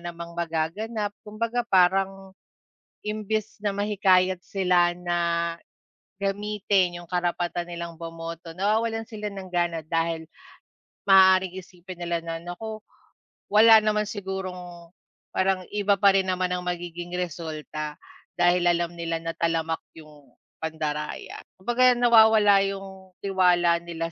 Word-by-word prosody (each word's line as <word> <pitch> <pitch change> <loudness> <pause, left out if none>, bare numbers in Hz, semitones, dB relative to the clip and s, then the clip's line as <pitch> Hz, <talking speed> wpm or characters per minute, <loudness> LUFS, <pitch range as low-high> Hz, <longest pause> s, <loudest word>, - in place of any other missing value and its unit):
namang 170 0 -8
magaganap, 170 +6 -2
kumbaga 230 +3 -2
parang 190 +1 +2 0.7
imbes 215 0 -3
na 205 - +1
mahikayat 190 -3 +2
sila 180 -3 +2
na 170 -1 -1 0.6
gamitin 195 -3 0
yung - - -20
karapatan 175 0 -1
nilang 170 -1 -7
bumoto, 165 0 -7
nawawalan 225 +3 0
sila 210 -2 -6
ng 195 -2 -8
gana 170 -2 0
dahil 165 0 -1 0.8
maaaring 190 -1 +5
isipin 180 0 -12
nila 170 -1 -2
na, 165 0 -4
naku, 215 +6 -7 0.7
wala 220 +2 +7
naman 210 0 +1
sigurong 185 -4 -6 0.4
parang 185 -1 +1
iba 205 -1 +2
pa 200 0 +5
rin 190 -1 +1
naman 185 0 0
ang 180 - 0
magiging 175 0 -5
resulta 155 -3 -5 0.4
dahil 175 0 +3
alam 175 0 +1
nila 170 -1 -3
na 165 - -2
talamak 165 -1 -1 0.2
yung 150 -5 -16 0.2
pandaraya. 155 -1 -4 0.2
Kumbaga 245 +5 +3
nawawala 220 -4 +6
yung 190 -1 -8
tiwala 175 -3 +3
nila 165 -1 -5
180 Hz, 115 wpm, -25 LUFS, 170-200 Hz, 0.8 s, wala